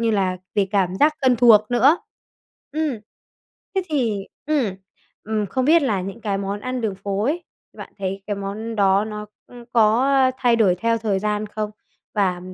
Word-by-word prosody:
như 230 -1 +2
là 190 -3 +1 0.2
về 200 -2 +2
cảm 190 -3 +1
giác 300 +5 +4
thân 255 -2 +4
thuộc 220 -2 +6
nữa. 265 +8 +4 0.7
Ừm. 305 -6 -1 0.8
Thế 380 - +1
thì 230 -10 -1 0.2
ừm, 265 -11 +1 0.5
ừm, 215 -1 -1
không 260 +6 -1
biết 325 +2 +5
là 210 -8 0
những 195 +5 -6
cái 200 -2 -2
món 200 +1 -3
ăn 255 0 -3
đường 215 -4 -1
phố 195 +1 -3
ấy, 335 +6 -1 0.3
bạn - - -10
thấy 195 0 -3
cái 205 -1 -2
món 215 +3 -5
đó 195 0 +3
nó, 210 -1 -6 0.2
ừm, 240 -1 -13
có 230 +3 +4 0.3
thay 240 -2 +3
đổi 195 -6 +4
theo 230 +5 0
thời 210 -3 0
gian 210 +1 -1
không? 210 0 -4 0.4
Và 185 -4 +1
215 Hz, 180 wpm, -22 LUFS, 200-245 Hz, 0.8 s, thuộc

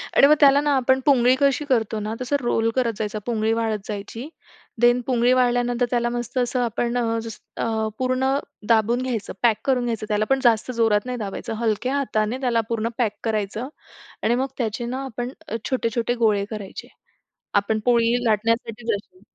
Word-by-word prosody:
आणि 280 - +7
मग 300 - +7
त्याला 285 0 +6
ना 295 -1 +1
आपण 260 +1 +3
पुंगळी 255 -3 +5
कशी 280 +1 +2
करतो 225 -5 0
ना, 215 +1 -3
तसं 255 +3 0
रोल 230 -2 +1
करत 245 -3 +1
जायचा, 215 -1 -3
पुंगळी 225 -2 0
वाळत 225 -1 0
जायची. 215 +5 -6 0.5
देन 240 +1 +5
पुंगळी 245 -1 +3
वाळल्यानंतर, 245 -1 +2
त्याला 240 -1 +1
मस्त 240 +1 -4
असं 250 0 0
आपण 235 +1 -1
अ, 230 -1 0
जसं 220 0 -4
पूर्ण 255 0 0 0.4
दाबून 230 +2 +3
घ्यायचं, 245 -5 -3
पॅक 225 -3 +4
करून 255 -3 +2
घ्यायचं, 225 -2 -2
त्याला 210 0 +1
पण 270 0 +3
जास्त 235 +1 +3
जोरात 225 -2 +2
नाही 250 0 -3
दाबायचं, 210 0 -5
हलक्या 235 +4 0
हाताने 235 -4 0
त्याला 240 -3 +2
पूर्ण 230 0 -1
पॅक 225 -4 0
करायचं. 220 +1 -2 0.6
आणि 235 - +3
मग 265 +2 0
त्याचे 235 0 -2
ना 260 +3 -4
आपण 245 -1 -4 0.4
छोटे-छोटे 235 -2 0
गोळे 205 -2 +3
करायचे. 210 -3 -7 0.7
आपण 205 +2 +2
पोळी 235 -1 +3
लाटण्यासाठी 230 +1 0
जसे. 225 - -6
235 Hz, 170 wpm, -23 LUFS, 220-250 Hz, 0.7 s, आणि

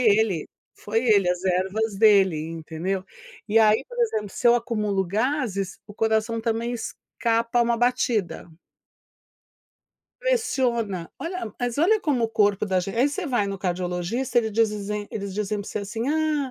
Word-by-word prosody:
ele, 215 -7 +2 0.3
foi 225 +4 -2
ele, 200 -5 +4
as 180 +1 -3
ervas 190 +3 0
dele, 195 -5 +5
entendeu. 165 +4 -4 0.4
E 225 +2 +5
aí, 215 0 +4
por 485 - -10
exemplo, 215 - 0
se 240 - -2
eu 240 - +6
acumulo 210 -5 -1
gases, 215 - -1
o 205 - -12
coração 220 +1 0
também 230 +1 -1
escapa 230 0 -1
uma 235 0 +1
batida. 230 -9 0 1.7
Pressiona. 240 - 0
Olha 335 - -5
mas 245 +2 -2
olha 415 +7 +4
como 275 - +1
o - - 0
corpo 205 -2 +2
da 190 -2 +1
gente 195 +4 -5
aí 265 +4 +4
você 355 +6 -4
vai 240 -6 +1
no 200 0 -3
cardiologista, 180 +7 -1
eles 220 -2 0
dizizem 210 -1 0
eles 200 -2 -4
dizem 210 +1 -2
pra 200 - -8
você - - -3
assim: 225 +5 -3
"Ah, 305 -3 0
220 Hz, 155 wpm, -24 LUFS, 195-240 Hz, 1.7 s, eu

